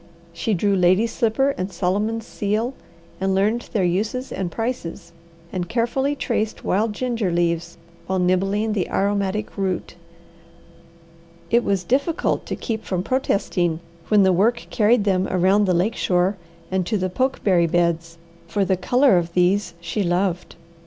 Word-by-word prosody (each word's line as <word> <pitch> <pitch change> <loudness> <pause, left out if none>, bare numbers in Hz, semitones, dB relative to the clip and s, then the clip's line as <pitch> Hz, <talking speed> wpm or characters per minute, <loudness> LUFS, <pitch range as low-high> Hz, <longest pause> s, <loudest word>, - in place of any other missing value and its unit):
She 205 +5 -1
drew 200 +3 +1
lady's 185 +5 +3
slipper 255 +4 +2
and 185 +2 -3
Solomon's 205 +5 -1
seal, 215 +4 -2 0.5
and 190 0 0
learned 215 +5 0
their 205 - +1
uses 210 +9 -1
and 185 -3 -3
prices; 180 -6 -4 0.4
and 180 -2 -3
carefully 250 +5 0
traced 220 -5 -2
wild 210 +3 +1
ginger 235 -4 -1
leaves 170 -1 -1 0.3
while 190 - 0
nibbling 195 +4 +1
the 195 -4 -1
aromatic 200 +1 -1
root. 190 -3 -2 1.6
It 235 +1 +4
was 195 -2 0
difficult 280 - 0
to - - -2
keep 220 -3 -4
from 185 -2 -2
protesting 185 -9 0 0.3
when 210 -2 +5
the 190 -1 +4
work 230 +7 +2
carried 215 +1 +3
them 190 -2 +1
around 190 +3 +3
the 185 -2 +2
lake 190 +6 +1
shore 180 +2 +1 0.4
and 190 0 +1
to 220 - 0
the 185 -1 -2
pokeberry 195 -8 +2
beds, 170 -1 0 0.3
for 200 +3 0
the 190 -1 +1
colour 245 +2 +4
of 170 0 -5
these 180 +1 +2
she 190 +5 -3
loved. 180 0 -1
195 Hz, 150 wpm, -22 LUFS, 180-225 Hz, 1.6 s, when